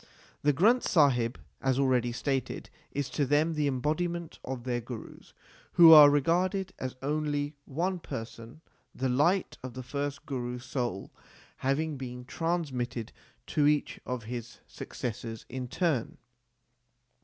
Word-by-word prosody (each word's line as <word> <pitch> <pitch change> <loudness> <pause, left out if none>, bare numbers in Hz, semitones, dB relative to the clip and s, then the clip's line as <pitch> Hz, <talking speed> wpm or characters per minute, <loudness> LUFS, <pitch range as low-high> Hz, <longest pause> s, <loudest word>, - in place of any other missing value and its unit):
The 145 - +4
Granth 215 - +4
Sahib, 125 -7 +3 0.2
as 130 -1 +1
already 130 -3 +2
stated, 135 +1 -3 0.2
is 140 -1 -2
to 145 - 0
them 145 +4 +2
the 150 -2 0
embodiment 155 +5 -2
of 130 -2 -5
their 120 -1 -1
Gurus, 120 -1 -10 0.4
who 165 -2 +10
are 150 -2 +11
regarded 180 +6 +1
as 130 -1 -4
only 145 0 -1
one 175 +6 -1
person, 115 0 -8 0.3
the 130 0 -1
light 170 +9 +2
of 130 -1 -7
the 130 - -5
first 140 +2 -4
Guru 125 -3 -3
s 125 0 -9
soul 120 -7 -3 0.5
having 145 +3 0
been 125 -1 -7
transmitted 130 -8 -2 0.3
to 145 -1 +2
each 150 0 +1
of 125 -2 -3
his 120 +1 -6
successors 115 -1 -6
in 130 0 -4
turn. 145 -4 -1
135 Hz, 135 wpm, -29 LUFS, 125-155 Hz, 0.5 s, are